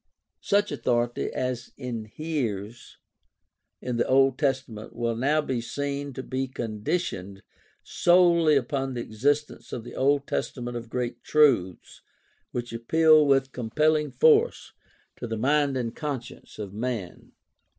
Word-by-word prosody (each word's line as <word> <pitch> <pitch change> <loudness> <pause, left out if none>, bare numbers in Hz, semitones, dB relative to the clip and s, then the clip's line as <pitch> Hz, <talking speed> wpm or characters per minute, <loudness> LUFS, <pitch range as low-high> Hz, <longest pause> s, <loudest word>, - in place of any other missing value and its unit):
Such 205 +1 +1
authority 120 0 -1
as 125 -1 -3
inheres 120 -2 -5 0.9
in 125 -2 -2
the 120 - +1
Old 135 0 +3
Testament 130 -6 -2
will 115 -1 -1
now 145 +6 +2
be 130 -5 -2
seen 140 +4 -4
to 130 - -6
be 130 0 -3
conditioned 110 - -4 0.4
solely 170 -3 +4
upon 135 0 -1
the 120 - -3
existence 145 +8 -1
in 115 - -5
the - - -10
Old 140 +1 +2
Testament 120 -3 -3
of 115 -1 -6
great 125 -1 -3
truths 135 - +2 0.5
which 120 -1 -5
appeal 155 +6 +4
with 135 -1 +3
compelling 150 +6 +1
force 470 0 +3 0.4
to 120 - -5
the 115 -1 -3
mind 140 +3 +2
and 115 -2 -3
conscience 140 -6 -6
of 100 -3 -6
man. 110 -4 -5
130 Hz, 130 wpm, -26 LUFS, 115-150 Hz, 0.9 s, solely